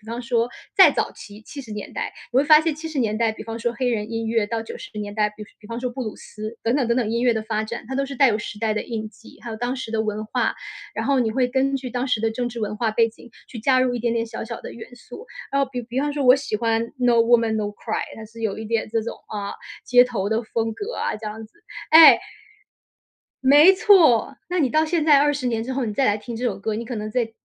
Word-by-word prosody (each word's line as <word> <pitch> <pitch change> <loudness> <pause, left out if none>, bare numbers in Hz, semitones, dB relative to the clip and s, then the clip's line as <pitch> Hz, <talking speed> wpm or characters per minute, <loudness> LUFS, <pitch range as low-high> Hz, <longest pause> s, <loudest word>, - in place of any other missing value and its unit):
比 210 - -21
方 235 +2 -5
说 235 -1 0 0.3
再 - - +9
早 - - -2
期 205 +1 -12
70 265 -2 -10
年 210 -1 -7
代， - - -4 0.2
你 - - -1
会 270 - +6
发 305 +1 +7
现 320 -2 -1
70 310 -2 -6
年 215 -3 0
代 230 -1 +2
比 220 0 -9
方 225 0 -6
说 235 0 -1
黑 250 +1 -1
人 220 -2 -2
音 225 0 -3
乐， 225 -1 +1
到 225 +2 -3
90 225 - -9
年 205 -1 -5
代 210 -1 +1
比 210 0 -10 0.2
比 210 - -15
方 230 0 -4
说 250 - -2
布 250 +2 -5
鲁 215 -3 -5
斯 215 +2 -9
等 230 +2 +2
等 265 -5 +1
等 235 - +2
等， 235 -4 0
音 235 +1 0
乐 245 -2 +4
的 220 -1 -3
发 220 -1 -1
展， 225 +1 -6
它 265 - -5
都 275 +1 0
是 275 -1 -7
带 275 - +6
有 210 - +1
时 210 -1 -7
代 220 -1 0
的 - - -2
印 220 -2 -5
记， 225 - -17
还 240 - -8
有 220 - -5
当 245 +3 -2
时 230 -3 -6
的 220 - +1
文 215 0 -3
化。 - - 0 0.4
然 - - -2
后 275 -2 +3
你 225 -2 +1
会 250 +2 +1
根 270 +2 0
据 255 -2 -6
当 250 +2 -2
时 235 -4 +1
的 225 - +1
政 245 +1 -2
治 235 0 -8
文 210 -1 -3
化 225 0 0
背 230 +1 +2
景， 230 +1 -16 0.2
去 230 - -8
加 255 +2 +3
入 255 -1 +1
一 240 - -3
点 235 0 0
点 230 0 -1
小 225 - -6
小 230 +1 -6
的 - - -8
元 245 +2 -11
素， 325 - -11 0.3
然 275 0 +2
后 265 - -1
比 250 -2 -4
比 245 +3 -3
方 290 +1 -1
说 285 -2 -2
我 250 +1 +8
喜 270 -6 -2
欢 225 0 +1 0.2
《No 240 -2 +3
woman， 230 -1 +4
No 210 -1 -1
cry》， 205 - -6 0.4
它 220 - -8
是 230 +1 -13
有 215 -1 -2
一 220 - -6
点 225 0 -1
这 225 - 0
种， 225 - -5
啊， 205 -1 -4 0.3
街 245 0 +6
头 225 -6 -2
的 220 +2 0
风 225 0 -2
格 430 - -5
啊 - - -1
这 215 +1 -9
样 215 +1 -6
子 - - -34 0.4
哎， 320 0 +10 1.2
没 295 +8 +7
错。 330 - +4
那 355 0 -1
你 270 -5 +2
到 310 +3 +2
现 320 -1 0
在 295 -3 +6
20 290 -3 +1
年 225 -2 -1
之 260 +2 -4
后， 260 -2 -1
你 215 - -3
再 265 +4 +1
来 205 +1 +2
听 230 +2 -7
这 245 - -5
首 235 - -2
歌， 215 +1 -2
你 230 +2 -5
可 245 - -6
能 215 0 -4
再 225 -2 -1
235 Hz, 310 characters per minute, -22 LUFS, 220-260 Hz, 1.2 s, 哎